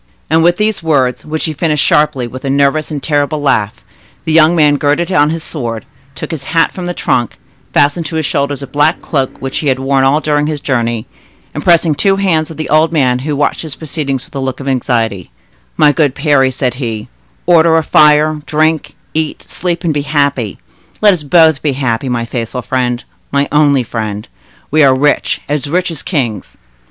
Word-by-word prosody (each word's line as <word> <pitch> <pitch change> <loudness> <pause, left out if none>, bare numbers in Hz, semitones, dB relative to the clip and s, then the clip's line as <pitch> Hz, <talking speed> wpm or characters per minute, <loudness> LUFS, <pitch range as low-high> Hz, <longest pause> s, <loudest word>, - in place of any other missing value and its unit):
And 160 +1 +4
with 175 +1 +3
these 215 -1 0
words, 140 -6 0
which 155 +1 -3
he 160 - -2
finished 150 -1 0
sharply 150 -4 +2
with 130 +2 -9
a 135 - -2
nervous 140 +2 +1
and 145 -3 -5
terrible 145 0 0
laugh, 110 -7 0 0.4
the 160 - -1
young 160 +1 +5
man 150 -3 +4
girded 150 +5 0
on 150 -5 +3
his 165 0 -3
sword, 115 -9 -5 0.3
took - - -6
his 155 -5 -6
hat 165 0 +1
from 180 -1 -6
the 175 - -4
trunk, 120 -2 -1 0.3
fastened 145 +3 +2
to 160 - -6
his 160 -1 -1
shoulder 140 +1 -1
a 140 - -6
black 145 +4 +1
cloak, 135 -4 -2
which 135 0 -3
he 150 - -3
had 130 -1 +2
worn 135 0 +1
all 135 +3 +3
during 150 -1 0
his 155 -1 -3
journey, 120 -5 -1 0.5
and - - -5
pressing 170 -2 +4
the 145 - -3
two 195 -1 +3
hands 170 -5 0
of 160 - -10
the 155 - -4
old 155 +2 +3
man, 130 -6 +1
who 145 +3 -3
watched 145 - 0
his 160 -4 -6
proceedings 140 -4 -4
with - - -22
a 140 - -4
look 130 -1 -3
of 140 - -7
anxiety,— 115 -7 -1 0.5
"My 150 - +5
good 145 -3 +1
Parry," 140 -3 +2
said 130 -1 -2
he, 115 -5 -5 0.4
"order 165 -2 +4
a 160 - +1
fire, 150 +1 +4
drink, 155 0 0 0.2
eat, 155 -1 -3
sleep, 175 0 -3
and 165 -3 0
be 145 - -1
happy; 140 -7 -1 0.4
let 210 -2 +5
us 175 - -3
both 160 0 +4
be 145 -3 0
happy, 130 -1 -2
my 120 -1 -1
faithful 120 +1 -4
friend, 125 +1 -1 0.3
my 140 0 +1
only 145 -3 +3
friend. 110 -2 -5 0.4
We 155 +2 +3
are 135 -1 +5
rich, 145 +2 +1
as 145 0 -2
rich 180 +2 0
as 160 - -6
kings!" 125 - -3
145 Hz, 205 wpm, -13 LUFS, 130-160 Hz, 0.5 s, young